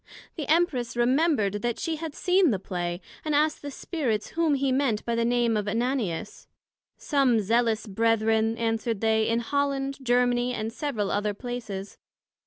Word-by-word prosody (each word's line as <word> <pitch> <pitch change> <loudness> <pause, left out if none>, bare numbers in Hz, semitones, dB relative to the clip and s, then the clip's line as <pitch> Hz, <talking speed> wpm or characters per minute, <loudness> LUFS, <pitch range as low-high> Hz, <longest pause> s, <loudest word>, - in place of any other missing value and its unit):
The 300 -5 -5
Empress 300 -8 +1
remembred 240 - +2
that 240 0 -1
she 325 -1 -2
had 315 -2 -6
seen 365 -1 +3
the 210 - +1
Play, 175 -1 -4 0.2
and 305 -2 0
asked 300 +1 +2
the 285 - -5
Spirits, 260 - -2
whom 320 -3 +1
he 275 -1 0
meant 255 -5 0
by 235 - -1
the 230 0 +1
name 240 -1 +2
of 210 -1 -1
Ananias? 225 -4 -2 0.5
some 270 -6 +2
Zealous 225 +2 +1
Brethren, 225 +1 +1
answered 225 -1 -1
they, 220 -1 +2
in 230 +1 +1
Holland, 275 +1 -1
Germany, 245 0 +2
and 220 +1 -4
several 235 -8 -2
other 205 0 -1
places. 220 -5 -6
240 Hz, 160 wpm, -26 LUFS, 220-275 Hz, 0.5 s, seen